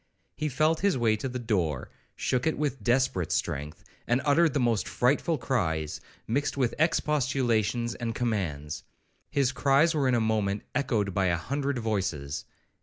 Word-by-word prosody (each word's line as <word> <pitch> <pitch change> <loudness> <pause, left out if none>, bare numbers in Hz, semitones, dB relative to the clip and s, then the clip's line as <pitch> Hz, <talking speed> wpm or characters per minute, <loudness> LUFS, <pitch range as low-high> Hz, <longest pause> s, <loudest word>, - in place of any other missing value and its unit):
He 155 -1 -2
felt 155 +4 +2
his 200 -6 +2
way 115 -3 +3
to 130 +5 -3
the 125 - -4
door, 90 - -1 0.2
shook 125 +2 0
it 160 - +1
with 145 -3 -2
desperate 120 -9 +1
strength, 75 +2 -2 0.2
and 120 +2 +3
uttered 155 +1 +4
the - - +3
most 120 -4 +1
frightful 145 +6 +1
cries, 80 - -1 0.2
mixed 140 +5 -1
with 125 -4 +1
expostulations 125 -7 +1
and 115 -2 -4
commands. 85 -12 -2 0.5
His 135 -3 +2
cries 140 +5 +3
were 145 -4 +1
in 125 - +3
a - - +3
moment 105 -2 0
echoed 115 -8 0
by 95 0 +2
a 85 -1 +2
hundred 140 - -2
voices. 95 - -2
120 Hz, 160 wpm, -28 LUFS, 100-140 Hz, 0.5 s, uttered